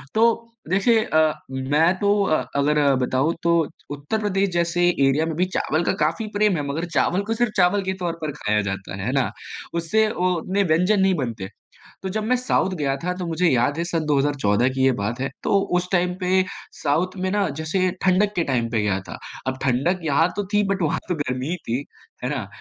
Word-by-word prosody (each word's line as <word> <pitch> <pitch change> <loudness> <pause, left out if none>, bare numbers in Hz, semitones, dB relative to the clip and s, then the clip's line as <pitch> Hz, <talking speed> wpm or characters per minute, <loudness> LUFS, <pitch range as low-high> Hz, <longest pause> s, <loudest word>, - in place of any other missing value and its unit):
तो 230 +1 +2 0.2
देखिए 215 +5 +3
अ, 155 -3 +2 0.2
मैं 145 +6 +2
तो 205 0 +2
अ, 155 -5 +1
अगर 145 +1 +2 0.2
बताऊँ 135 +6 +1
तो 170 0 +3 0.3
उत्तर-प्रदेश 195 +7 -1
जैसे 175 +1 +2
एरिया 140 -1 +2
में 160 -1 -3
भी 180 +3 +2
चावल 155 +2 0
का - - +1
काफ़ी 170 +8 -2
प्रेम 205 -2 +2
है, 145 - -2
मगर 155 +5 -2
चावल 170 +7 +2
को 220 +3 -2
सिर्फ़ 235 0 0
चावल 185 +2 +4
के 190 0 -1
तौर 170 -1 0
पर 155 -2 -2
खाया 105 -7 0
जाता 95 -1 -5
है, 100 0 -5
हैं 125 - -1
ना? 135 -2 +1 0.4
उससे 170 +6 +2
वो 185 -4 0
उतने 190 +4 0
व्यंजन 180 +4 +2
नहीं 190 0 +4
बनते। 115 - -3 0.6
तो 190 - -2
जब 215 - 0
मैं 250 +3 +2
साउथ 245 -6 +1
गया 140 -3 0
था, 180 +1 -1
तो 180 -1 -4
मुझे 165 +2 +1
याद 130 +3 +2
है - - +1
सन 165 -2 -2
2014 135 -6 +2
की 130 0 0
ये 135 - +5
बात 105 +5 -2
है, 135 - -1
तो 200 - +3 0.2
उस 180 0 -2
टाइम 180 0 +2
पे 185 +1 +3 0.4
साउथ 165 +6 +1
में 185 0 -1
ना, 205 -1 +1
जैसे 185 +4 0
ठंडक 195 +2 +3
के 170 - +1
टाइम 120 -4 0
पे 110 -3 +1
गया 100 -2 0
था। - - -6 0.3
अब 130 0 -1
ठंडक 140 +9 +1
यहाँ 160 +4 +3
तो 205 - -1
थी, 205 0 +4
बट 195 -1 -1
वहाँ 155 - 0
तो 180 - +1
गर्मी 130 -3 -3
ही 180 - 0
थी, 120 -7 -3 0.5
है 125 - -1
ना? 130 -9 -3
165 Hz, 215 wpm, -23 LUFS, 135-190 Hz, 0.6 s, ये